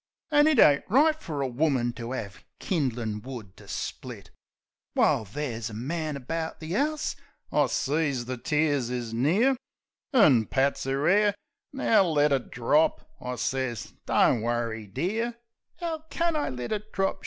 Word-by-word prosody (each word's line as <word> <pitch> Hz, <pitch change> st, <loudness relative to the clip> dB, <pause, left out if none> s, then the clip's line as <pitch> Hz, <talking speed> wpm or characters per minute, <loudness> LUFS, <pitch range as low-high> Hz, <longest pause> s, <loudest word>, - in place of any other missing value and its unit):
An' 295 Hz, 0 st, +5 dB
it 310 Hz, -3 st, +3 dB
ain't 145 Hz, -9 st, +6 dB
right 310 Hz, +7 st, +4 dB
fer 150 Hz, -, -4 dB
a 135 Hz, -, 0 dB
woman 130 Hz, -2 st, +1 dB
to 115 Hz, 0 st, -6 dB
'ave 100 Hz, -5 st, -6 dB, 0.2 s
kin'lin' 120 Hz, -, -1 dB
wood 115 Hz, -6 st, -9 dB
to -, -, -15 dB
split; -, -, -6 dB, 0.6 s
While 110 Hz, -, +3 dB
there's 115 Hz, 0 st, -4 dB
a 105 Hz, -, -8 dB
man 155 Hz, +6 st, -3 dB
about 160 Hz, +5 st, -4 dB
the 160 Hz, +3 st, -4 dB
'ouse!" 300 Hz, +5 st, 0 dB, 0.4 s
I -, -, +3 dB
sees 140 Hz, -4 st, 0 dB
the 130 Hz, +1 st, -4 dB
tears 145 Hz, -3 st, +1 dB
is 120 Hz, -2 st, -4 dB
near, 185 Hz, -, +3 dB, 0.6 s
An' 145 Hz, -, +5 dB
pats 135 Hz, 0 st, 0 dB
'er 135 Hz, +2 st, 0 dB
'air. 205 Hz, +2 st, +4 dB, 0.4 s
"Now, 225 Hz, -6 st, +3 dB
let 150 Hz, -3 st, +2 dB
it 135 Hz, -3 st, 0 dB
drop," 145 Hz, +6 st, +1 dB
I 125 Hz, 0 st, -4 dB
sez. 130 Hz, -2 st, -2 dB
"Don't 115 Hz, -, +3 dB
worry, 115 Hz, -2 st, -2 dB
dear." 215 Hz, -, -2 dB, 0.2 s
" -, -, -36 dB
'Ow 320 Hz, -2 st, -3 dB
can 335 Hz, -1 st, 0 dB
I 300 Hz, -, 0 dB
let 125 Hz, -1 st, -5 dB
it 215 Hz, 0 st, -3 dB
drop?" 195 Hz, 0 st, 0 dB
140 Hz, 160 wpm, -27 LUFS, 120-200 Hz, 0.6 s, ain't